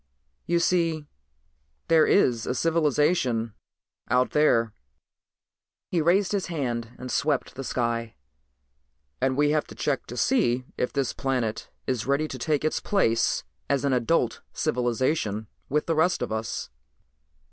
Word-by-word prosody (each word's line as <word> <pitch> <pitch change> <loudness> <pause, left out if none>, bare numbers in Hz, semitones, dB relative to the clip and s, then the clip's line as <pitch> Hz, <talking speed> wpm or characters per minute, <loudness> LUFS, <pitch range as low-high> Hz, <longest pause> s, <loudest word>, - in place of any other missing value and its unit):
You 170 - +2
see, 165 -3 +1 0.8
there 160 -2 +5
is 120 - +3
a 125 - -1
civilization 150 - +1 0.6
out 125 0 +2
there," 115 -7 +3 1.2
he 170 - +2
raised 180 +4 +3
his 200 -2 -1
hand 120 -8 -3
and 125 0 -6
swept 145 0 0
the 135 - -6
sky, 115 -2 -2 1.1
"and 130 0 +1
we 145 0 +3
have 150 0 +1
to - - -11
check 140 -3 -1
to 120 - -7
see 130 - +2
if 125 - -1
this 140 -3 -1
planet 125 -5 -2 0.2
is 125 -3 -2
ready 140 +3 +1
to - - -6
take 155 -2 0
its 155 - +1
place 115 - +1 0.3
as 140 0 +1
an 140 - +2
adult 125 +1 +1
civilization 120 -2 0 0.2
with 150 +2 +1
the 165 - +1
rest 175 +3 +2
of - - -4
us. 110 -10 -3
135 Hz, 140 wpm, -26 LUFS, 120-160 Hz, 1.2 s, there